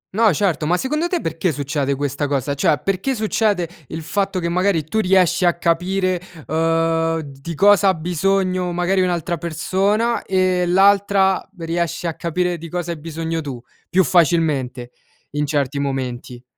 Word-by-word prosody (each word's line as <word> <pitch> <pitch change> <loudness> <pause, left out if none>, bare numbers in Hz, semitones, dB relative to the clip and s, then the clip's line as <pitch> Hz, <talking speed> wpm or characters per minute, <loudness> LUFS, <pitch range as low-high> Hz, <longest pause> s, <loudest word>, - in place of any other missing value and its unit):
No 220 -1 +4
certo, 165 -2 0
ma 175 +3 +2
secondo 300 - -1
te 350 -1 -1
perché 165 +2 -1
succede 140 -1 -2
questa 145 +1 -2
cosa; 140 0 -1
cioè 145 +1 +1
perché 195 +8 -1
succede 215 -4 0 0.2
il 160 +3 -6
fatto 195 +3 -1
che, 170 - -2
magari 180 -1 +1
tu 155 +9 -2
riesci 185 -3 +3
a 175 -1 +3
capire, 180 +2 0 0.2
uhm, 165 +1 +1
di 140 +2 -8
cosa 200 +3 +5
ha 190 - +5
bisogno 180 +2 0
magari 180 +2 +1
un'altra 175 -1 -1
persona 195 +8 0
e 185 -1 +1
l'altra 195 +1 +3
riesce 170 +1 -2
a 165 - -1
capire 175 +2 -2
di 165 +1 -8
cosa 175 0 -3
hai 165 - -6
bisogno 165 +1 -4
tu, 135 -5 -6 0.3
più 190 +1 +3
facilmente, 135 -6 +1 0.4
in 150 0 -1
certi 140 -1 -1
momenti? 130 -3 -4
170 Hz, 155 wpm, -20 LUFS, 155-190 Hz, 0.4 s, cosa